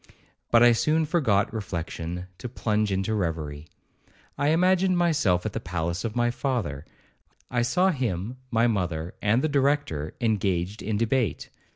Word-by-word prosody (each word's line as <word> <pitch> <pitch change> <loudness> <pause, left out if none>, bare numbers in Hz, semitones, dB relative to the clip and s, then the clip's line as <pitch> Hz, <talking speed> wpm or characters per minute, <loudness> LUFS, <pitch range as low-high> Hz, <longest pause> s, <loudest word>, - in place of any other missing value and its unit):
But 115 0 +6
I 120 - +8
soon 155 +7 +2
forgot 120 - +1
reflection, 90 -3 -4
to 125 - -5
plunge 105 -3 0
into 95 +3 0
reverie. 80 -6 -3 0.7
I 145 - 0
imagined 185 +3 +3
myself 140 - +2
at 110 - -2
the - - -2
palace 85 +2 -3
of 115 -1 -3
my 120 0 +2
father; 115 - -2 0.7
I 120 -1 +1
saw 180 +10 +2
him, 120 - -3
my 115 -1 +2
mother, 90 -7 -1
and 110 +5 +2
the - - +3
Director, 140 - 0
engaged 100 -4 0
in 105 +1 -1
debate. 115 - 0
110 Hz, 150 wpm, -26 LUFS, 90-130 Hz, 0.7 s, I